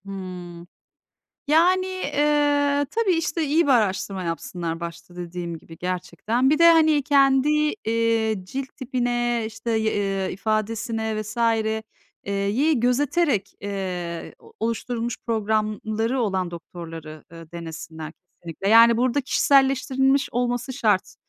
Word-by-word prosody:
Hıı. 180 Hz, -3 st, -8 dB, 0.8 s
Yani, 355 Hz, +5 st, +4 dB
eee, 290 Hz, -4 st, +1 dB
tabii 445 Hz, -2 st, +1 dB
işte, 330 Hz, -1 st, 0 dB
iyi 305 Hz, +3 st, +2 dB
bir -, -, +2 dB
araştırma 195 Hz, -4 st, 0 dB
yapsınlar 165 Hz, 0 st, -4 dB
başta 170 Hz, +1 st, -8 dB
dediğim 175 Hz, -1 st, -5 dB
gibi 165 Hz, 0 st, -14 dB
gerçekten. 185 Hz, -, -1 dB
Bir 305 Hz, -, +3 dB
de, 335 Hz, 0 st, +8 dB
hani, 315 Hz, -3 st, +4 dB
kendi, 275 Hz, 0 st, +4 dB, 0.4 s
eee, 225 Hz, -1 st, +1 dB
cilt 265 Hz, +8 st, -5 dB
tipine, 240 Hz, -2 st, -1 dB
işte, 225 Hz, +1 st, -6 dB
y 220 Hz, -1 st, +1 dB
eee, 195 Hz, -2 st, -1 dB
ifadesine 220 Hz, +2 st, -2 dB
vs. 215 Hz, +1 st, -9 dB, 0.9 s
eee, 200 Hz, -, -4 dB
yi 230 Hz, +9 st, +1 dB
gözeterek, 265 Hz, -, +1 dB
eee, 180 Hz, -4 st, -5 dB
o -, -, -19 dB
oluşturulmuş 230 Hz, +1 st, -2 dB
programları 220 Hz, +2 st, -1 dB
olan 190 Hz, -5 st, -1 dB
doktorları, 165 Hz, -2 st, -9 dB
eee, 165 Hz, -1 st, -12 dB
denesinler 160 Hz, -2 st, -7 dB
kesinlikle. 175 Hz, +1 st, -7 dB
Yani 230 Hz, +1 st, +7 dB
burada 255 Hz, +3 st, +1 dB
kişiselleştirilmiş 270 Hz, 0 st, +2 dB
olması 245 Hz, +1 st, -1 dB
şart. 215 Hz, -7 st, 0 dB
225 Hz, 120 wpm, -23 LUFS, 185-270 Hz, 0.9 s, de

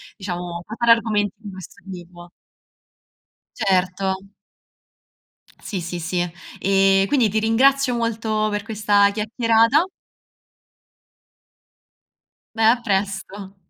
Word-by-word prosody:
diciamo, 175 Hz, -3 st, -6 dB
fa 220 Hz, -, -7 dB
fare 235 Hz, -1 st, +3 dB
argomenti 210 Hz, -3 st, +2 dB
di 210 Hz, -2 st, -9 dB
questo 190 Hz, +1 st, -12 dB
tipo. 175 Hz, -1 st, -11 dB, 1.3 s
Certo. 190 Hz, +1 st, -1 dB, 1.3 s
Sì, 195 Hz, -4 st, -5 dB
sì, 175 Hz, +1 st, -5 dB
sì, 175 Hz, +2 st, -3 dB
eh, 195 Hz, +2 st, +1 dB
e -, -, +1 dB
quindi 250 Hz, -7 st, +2 dB
ti 220 Hz, -, 0 dB
ringrazio 255 Hz, +4 st, +2 dB
molto 220 Hz, -2 st, -1 dB
per 205 Hz, 0 st, -2 dB
questa 205 Hz, -2 st, +2 dB
chiacchierata 230 Hz, -, +2 dB, 2.7 s
Beh 225 Hz, 0 st, +4 dB
a 240 Hz, 0 st, -1 dB
presto. 195 Hz, -1 st, -3 dB
205 Hz, 100 wpm, -21 LUFS, 190-225 Hz, 2.7 s, Beh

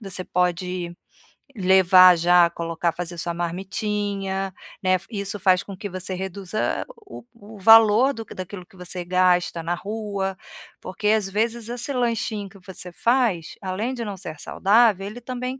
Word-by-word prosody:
você 195 Hz, -3 st, -5 dB
pode 180 Hz, 0 st, -1 dB, 0.6 s
levar 185 Hz, -1 st, +6 dB
já, 175 Hz, +1 st, +5 dB
colocar 170 Hz, 0 st, -2 dB
fazer 175 Hz, 0 st, -5 dB
sua 170 Hz, +1 st, -3 dB
marmitinha, 195 Hz, +2 st, -3 dB, 0.3 s
né. 185 Hz, 0 st, +3 dB
Isso 200 Hz, -2 st, -4 dB
faz 185 Hz, -1 st, +3 dB
com 200 Hz, -, -9 dB
que 205 Hz, 0 st, -6 dB
você 185 Hz, 0 st, -4 dB
reduza 190 Hz, +2 st, -3 dB
o 420 Hz, -3 st, -12 dB, 0.2 s
o 210 Hz, +1 st, -12 dB
valor 225 Hz, +5 st, +6 dB
do 225 Hz, -, -7 dB
daquilo 185 Hz, -1 st, -8 dB
que -, -, -23 dB
você 180 Hz, 0 st, -5 dB
gasta 180 Hz, -2 st, +2 dB
na 170 Hz, +2 st, -1 dB
rua, 200 Hz, -1 st, -4 dB, 0.4 s
porque, 190 Hz, +3 st, -4 dB
às 215 Hz, -3 st, +2 dB
vezes, 225 Hz, +3 st, -1 dB
esse 245 Hz, +3 st, 0 dB
lanchinho 230 Hz, -4 st, -1 dB
que 195 Hz, -1 st, -17 dB
você 185 Hz, -1 st, -8 dB
faz, 230 Hz, -5 st, 0 dB
além 200 Hz, +7 st, -3 dB
de 240 Hz, -, -4 dB
não 200 Hz, -2 st, -5 dB
ser 160 Hz, -4 st, -8 dB
saudável, 200 Hz, +1 st, +2 dB
ele 235 Hz, +4 st, -9 dB
também 255 Hz, +1 st, -5 dB
195 Hz, 155 wpm, -23 LUFS, 180-215 Hz, 0.6 s, levar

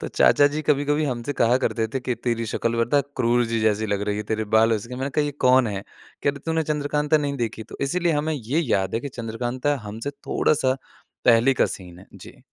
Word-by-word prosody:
तो -, -, -4 dB
चाचा 145 Hz, -, +5 dB
जी 150 Hz, +2 st, -2 dB
कभी-कभी 145 Hz, +1 st, +1 dB
हमसे 125 Hz, -1 st, -2 dB
कहा 120 Hz, -1 st, +3 dB
करते 115 Hz, -3 st, 0 dB
थे 130 Hz, +4 st, -3 dB
कि 125 Hz, 0 st, -2 dB
"तेरी 115 Hz, -1 st, -2 dB
शक़्ल 115 Hz, +1 st, 0 dB
पता 145 Hz, +5 st, +2 dB, 0.2 s
क्रूर 120 Hz, -1 st, +2 dB
जी 115 Hz, -, +1 dB
जैसी 110 Hz, 0 st, +1 dB
लग 100 Hz, -1 st, -1 dB
रही 105 Hz, -, 0 dB
है, 105 Hz, -, -2 dB
तेरे 110 Hz, +1 st, -2 dB
बालों 110 Hz, +1 st, +3 dB
से।" 105 Hz, -, -10 dB
मैंने 135 Hz, +2 st, -3 dB
कहा 150 Hz, +2 st, +1 dB
ये 145 Hz, -, -1 dB, 0.2 s
कौन 130 Hz, 0 st, +5 dB
है? 100 Hz, -2 st, -4 dB, 0.4 s
कह 140 Hz, -, +3 dB
रहे 140 Hz, -, -10 dB
"तूने 160 Hz, 0 st, +1 dB
चंद्रकांता 150 Hz, 0 st, 0 dB
नहीं 140 Hz, -1 st, -2 dB
देखी?" 115 Hz, -2 st, -3 dB
तो -, -, -11 dB
इसीलिए 170 Hz, +4 st, +1 dB
हमें 150 Hz, +2 st, 0 dB
ये 135 Hz, +4 st, -1 dB
याद 100 Hz, -, 0 dB
है 115 Hz, -, 0 dB
कि 140 Hz, -, -5 dB
चंद्रकांता 125 Hz, +3 st, -2 dB
हमसे 110 Hz, +6 st, -5 dB
थोड़ा-सा 140 Hz, -1 st, 0 dB, 0.5 s
पहले 120 Hz, +3 st, +5 dB
का -, -, +3 dB
सीन 90 Hz, -2 st, -8 dB
है। 95 Hz, -, -15 dB
जी। -, -, -13 dB
125 Hz, 225 wpm, -23 LUFS, 110-145 Hz, 0.5 s, चाचा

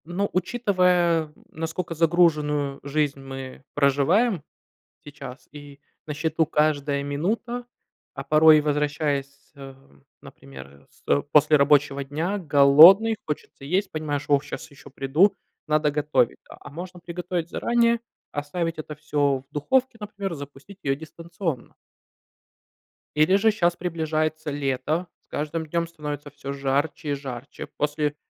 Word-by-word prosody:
Ну, 185 Hz, +5 st, -2 dB
учитывая, 180 Hz, -5 st, +2 dB, 0.2 s
наскока 165 Hz, +2 st, -4 dB
загруженную 150 Hz, -4 st, +2 dB
жизнь 145 Hz, 0 st, -1 dB
мы 135 Hz, -1 st, -8 dB
проживаем 155 Hz, -, +2 dB, 0.6 s
сейчас 140 Hz, -3 st, -10 dB
и 145 Hz, -1 st, -12 dB, 0.3 s
на 150 Hz, -, -4 dB
счету 160 Hz, +1 st, 0 dB
каждая 145 Hz, -2 st, +1 dB
минута, 220 Hz, +12 st, -3 dB, 0.5 s
а 135 Hz, -, -6 dB
порой 155 Hz, +1 st, +6 dB
возвращаясь, 145 Hz, -1 st, -2 dB
э, 135 Hz, -1 st, -10 dB, 0.5 s
например, 70 Hz, +1 st, -13 dB
с -, -, -27 dB
э, 70 Hz, -, +2 dB
после 150 Hz, 0 st, +5 dB
рабочего 140 Hz, -1 st, +3 dB
дня, 160 Hz, +9 st, -2 dB
голодный, 165 Hz, +8 st, +7 dB
хочется 150 Hz, -2 st, -6 dB
есть, 185 Hz, +8 st, 0 dB
понимаешь: 150 Hz, -2 st, -3 dB
"О, 145 Hz, -1 st, +4 dB
щас 150 Hz, +2 st, -8 dB
еще 145 Hz, +1 st, -15 dB
приду, 145 Hz, +9 st, +2 dB, 0.3 s
надо 155 Hz, -1 st, +2 dB
готовить",- 145 Hz, -4 st, +1 dB
да. -, -, -12 dB
А -, -, -11 dB
можно 175 Hz, +4 st, -8 dB
приготовить 175 Hz, 0 st, -4 dB
заранее, 235 Hz, -1 st, +2 dB, 0.3 s
оставить 165 Hz, +3 st, -3 dB
это 155 Hz, 0 st, -6 dB
всё 145 Hz, -3 st, 0 dB
в -, -, -48 dB
духовке, 245 Hz, -, 0 dB
например, 200 Hz, -2 st, -5 dB
запустить 145 Hz, +6 st, -11 dB
её 135 Hz, -1 st, 0 dB
дистанционно. 165 Hz, -2 st, -6 dB, 1.4 s
Или 155 Hz, +5 st, +4 dB
же 220 Hz, +3 st, +4 dB
щас 175 Hz, -5 st, +1 dB
приближается 155 Hz, -3 st, -2 dB
лето, 145 Hz, +4 st, -2 dB
с -, -, -45 dB
каждым 155 Hz, +2 st, -3 dB
днём 170 Hz, +2 st, -1 dB
становится 150 Hz, -3 st, -6 dB
всё 140 Hz, -1 st, -7 dB
жарче 140 Hz, +2 st, -1 dB
и -, -, +1 dB
жарче. 135 Hz, -2 st, -7 dB
После 150 Hz, 0 st, -1 dB
150 Hz, 130 wpm, -24 LUFS, 140-170 Hz, 1.4 s, голодный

